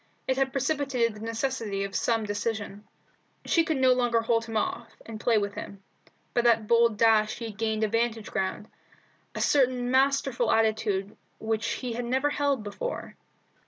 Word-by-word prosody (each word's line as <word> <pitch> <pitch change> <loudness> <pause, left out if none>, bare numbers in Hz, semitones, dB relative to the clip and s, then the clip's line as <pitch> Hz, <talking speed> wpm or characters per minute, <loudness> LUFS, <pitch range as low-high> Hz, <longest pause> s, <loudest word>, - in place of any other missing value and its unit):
It 260 - +2
had 265 0 0
precipitated 270 -4 0
the 210 - -11
necessity 225 -3 -2
of 195 0 -5
some 225 -2 +1
decision. 205 0 -4 0.6
She 335 - +3
could 320 -3 -1
no 260 -1 +5
longer 240 -2 +1
hold 230 0 +1
him 225 -1 -3
off, 230 +2 -2 0.2
and 225 -1 -8
play 230 0 +2
with 205 -1 -1
him. 200 -1 -8 0.5
By 240 - +3
that 230 -2 +3
bold 230 -1 +4
dash 220 -1 +3
he 235 - -6
had 205 - -19
gained 220 -1 0
a - - +3
vantage 230 0 -1
ground, 200 +1 -2 0.7
a - - -3
certain 250 -3 +2
masterful 270 -2 +2
attitude 215 -3 +1 0.2
which 220 0 -2
he 250 -2 -3
had 240 +1 -3
never 265 +4 +1
held 280 -5 0
before. - - -5
230 Hz, 170 wpm, -27 LUFS, 215-255 Hz, 0.7 s, no